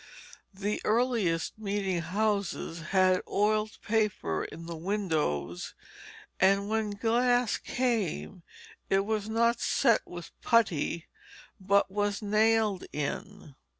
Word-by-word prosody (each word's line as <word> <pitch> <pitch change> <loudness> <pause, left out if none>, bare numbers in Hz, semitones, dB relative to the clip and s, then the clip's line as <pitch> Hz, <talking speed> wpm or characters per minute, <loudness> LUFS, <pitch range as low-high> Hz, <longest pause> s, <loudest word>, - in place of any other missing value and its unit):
The 205 +2 -2
earliest 215 -7 +1
meeting 200 -3 -1
houses 200 -3 -1
had 185 -1 +4
oiled 215 +1 +1
paper 210 - 0
in 165 - -9
the 170 0 -6
windows, 160 - -2 0.6
and 195 +1 +3
when 220 0 0
glass 240 +3 +1
came 220 -7 -2 0.5
it 195 0 +3
was 215 0 -2
not 235 +1 +2
set 235 -4 +3
with 175 -1 -9
putty, 170 -8 +1 0.5
but 200 0 +2
was 205 0 0
nailed 215 -1 +2
in. 150 +3 -5
205 Hz, 105 wpm, -29 LUFS, 180-220 Hz, 0.6 s, had